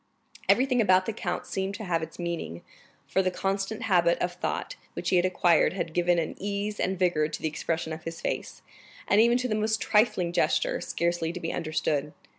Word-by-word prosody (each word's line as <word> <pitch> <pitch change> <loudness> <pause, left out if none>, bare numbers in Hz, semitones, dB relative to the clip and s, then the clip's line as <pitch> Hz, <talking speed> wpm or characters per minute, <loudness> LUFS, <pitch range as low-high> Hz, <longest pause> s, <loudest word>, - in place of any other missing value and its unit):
Everything 255 -1 +4
about 185 -3 +4
the 225 - -2
count 180 -4 -3
seemed 195 +1 -3
to 220 - -6
have 170 -4 0
its 160 0 -7
meaning, 170 - -4 0.4
for 190 - +1
the 185 - +1
constant 195 +3 -2
habit 175 -4 +3
of 175 0 -1
thought 180 - -3 0.2
which - - -3
he - - +4
had 175 - +3
acquired 175 -2 +3
had 170 -4 -3
given 175 0 +2
an 165 -2 -1
ease 205 +1 -3
and 190 +1 0
vigor 175 -4 +2
to - - -6
the - - -1
expression 160 +1 -2
of 160 - -8
his 165 0 -6
face, - - -4 0.4
and 205 - +5
even 235 +1 +5
to 255 0 -1
the 220 - -1
most 215 +1 +1
trifling 210 -5 +2
gesture, - - +1
scarcely 170 -1 -1
to 180 - -6
be 165 - -3
understood. 155 -3 -1
180 Hz, 205 wpm, -27 LUFS, 170-205 Hz, 0.4 s, and